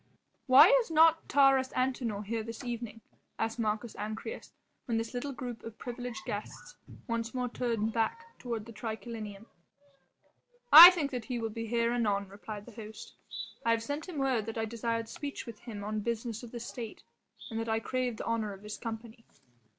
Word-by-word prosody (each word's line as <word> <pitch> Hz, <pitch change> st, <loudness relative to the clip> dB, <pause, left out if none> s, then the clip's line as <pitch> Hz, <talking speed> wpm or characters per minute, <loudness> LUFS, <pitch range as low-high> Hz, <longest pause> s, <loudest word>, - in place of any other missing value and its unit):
"Why 260 Hz, +1 st, +10 dB, 0.2 s
is 460 Hz, -, -8 dB
not 325 Hz, 0 st, +4 dB
Taurus 270 Hz, -2 st, +5 dB
Antinor 245 Hz, -5 st, -1 dB
here 225 Hz, +2 st, -2 dB
this 230 Hz, +1 st, -7 dB
evening?" 235 Hz, -2 st, -5 dB, 0.4 s
asked 225 Hz, +1 st, -2 dB
Marcus 220 Hz, +1 st, -1 dB
Ancyrus 220 Hz, -, -6 dB, 0.3 s
when 230 Hz, -4 st, 0 dB
this 225 Hz, +2 st, -3 dB
little 250 Hz, +3 st, -3 dB
group 245 Hz, -3 st, -6 dB
of 225 Hz, -1 st, -9 dB
privileged 245 Hz, -3 st, -6 dB
guests 205 Hz, +1 st, -6 dB, 0.3 s
once 230 Hz, -1 st, -3 dB
more 250 Hz, -1 st, 0 dB
turned 230 Hz, -3 st, -1 dB
back 460 Hz, -, -2 dB
toward 230 Hz, -4 st, -4 dB
the 230 Hz, -, -11 dB
triclinium. 220 Hz, -1 st, -6 dB, 1.3 s
"I 335 Hz, +4 st, +15 dB
think 320 Hz, -6 st, -1 dB
that 245 Hz, -4 st, -4 dB
he 250 Hz, -, -3 dB
will 225 Hz, -1 st, -3 dB
be 230 Hz, +1 st, -5 dB
here 235 Hz, +1 st, +1 dB
anon," 205 Hz, -4 st, 0 dB
replied 205 Hz, +1 st, -8 dB
the 245 Hz, -, -11 dB
host. 220 Hz, -1 st, -10 dB, 0.5 s
"I 230 Hz, -, 0 dB
have 230 Hz, 0 st, +2 dB
sent 290 Hz, +7 st, -4 dB
him 340 Hz, -, -6 dB
word 260 Hz, -6 st, +1 dB
that 225 Hz, -, -5 dB
I 225 Hz, -, 0 dB
desired 230 Hz, 0 st, -2 dB
speech 285 Hz, +4 st, -6 dB
with 230 Hz, -3 st, -9 dB
him 215 Hz, -4 st, -8 dB
on 215 Hz, +1 st, -2 dB
business 230 Hz, +1 st, -3 dB
of 240 Hz, -, -9 dB
the 240 Hz, -, -6 dB
State 230 Hz, -1 st, -7 dB, 0.5 s
and 225 Hz, -, -2 dB
that 225 Hz, 0 st, -3 dB
I 220 Hz, 0 st, +2 dB
craved 250 Hz, 0 st, -2 dB
the -, -, -5 dB
honour 220 Hz, -3 st, -1 dB
of 195 Hz, +1 st, -13 dB
his 210 Hz, 0 st, -6 dB
company." 230 Hz, 0 st, -7 dB
230 Hz, 185 wpm, -31 LUFS, 220-250 Hz, 1.3 s, I